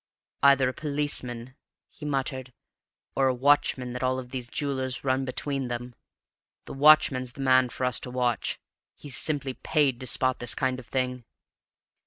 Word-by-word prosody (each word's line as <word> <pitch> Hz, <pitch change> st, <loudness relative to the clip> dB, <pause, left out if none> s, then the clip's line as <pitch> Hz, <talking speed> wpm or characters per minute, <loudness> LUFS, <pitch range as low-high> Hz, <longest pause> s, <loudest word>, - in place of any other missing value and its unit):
"Either 140 Hz, -1 st, +5 dB
a 130 Hz, -, -2 dB
policeman," 130 Hz, -5 st, -2 dB, 0.3 s
he 150 Hz, -, -12 dB
muttered, 130 Hz, -3 st, -3 dB, 0.6 s
"or 135 Hz, -, +3 dB
a 130 Hz, -, +1 dB
watchman 130 Hz, -2 st, +2 dB
that 125 Hz, -, -5 dB
all 130 Hz, 0 st, 0 dB
these 125 Hz, -1 st, -6 dB
jewellers 130 Hz, -3 st, -2 dB
run 130 Hz, 0 st, 0 dB
between 135 Hz, 0 st, -3 dB
them. 120 Hz, 0 st, -5 dB, 0.7 s
The -, -, -8 dB
watchman's 135 Hz, -3 st, +4 dB
the 140 Hz, -, -8 dB
man 130 Hz, -1 st, +4 dB
for 130 Hz, -, -3 dB
us 125 Hz, -, +2 dB
to -, -, -5 dB
watch; 125 Hz, -2 st, -1 dB, 0.4 s
he's 140 Hz, -3 st, -4 dB
simply 140 Hz, -4 st, 0 dB
paid 145 Hz, -4 st, 0 dB
to 130 Hz, -, -4 dB
spot 130 Hz, +1 st, +2 dB
this 120 Hz, -2 st, +1 dB
kind 130 Hz, -1 st, -1 dB
of 125 Hz, -, -13 dB
thing." 125 Hz, -1 st, -2 dB
130 Hz, 160 wpm, -26 LUFS, 125-140 Hz, 0.7 s, Either